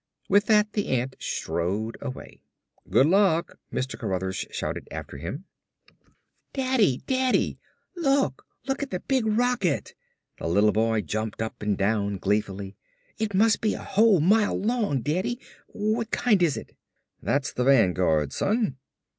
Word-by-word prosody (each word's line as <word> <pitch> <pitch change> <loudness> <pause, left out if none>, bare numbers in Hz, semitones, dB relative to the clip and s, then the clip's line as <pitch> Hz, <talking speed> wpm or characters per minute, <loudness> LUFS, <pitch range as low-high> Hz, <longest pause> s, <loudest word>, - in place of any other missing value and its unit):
With 205 +1 +3
that 210 -1 +4
the 205 - -1
ant 130 +1 -1
strode 100 +7 -2
away. 135 -2 -8 0.5
"Good 135 - +5
luck!" 175 -1 +2
Mr. 130 +1 -3
Cruthers 95 0 -2
shouted - - -4
after - - -7
him. 85 - -6 1.1
"Daddy! 255 - +1
Daddy, 260 -1 +1 0.4
look! 275 - +1 0.2
Look 270 0 -2
at 285 - -3
the 180 - -3
big 260 -5 0
rocket!" 220 - +1 0.5
The - - -3
little 100 +5 +4
boy 110 0 +1
jumped 110 +4 -4
up 110 0 -4
and 105 -2 0
down 100 0 0
gleefully. 100 0 -2 0.4
"It 210 -3 -1
must 215 +2 +4
be 215 - +1
a - - -7
whole 205 -4 +4
mile 205 +5 +3
long, 215 - 0
Daddy! 185 +11 -1 0.3
What 215 +2 -1
kind 215 -6 +2
is 165 -5 +2
it?" - - -9 0.5
"That's 140 0 0
the 125 - -1
Vanguard, 90 - +3
son." 210 - 0
150 Hz, 140 wpm, -26 LUFS, -, 1.1 s, Good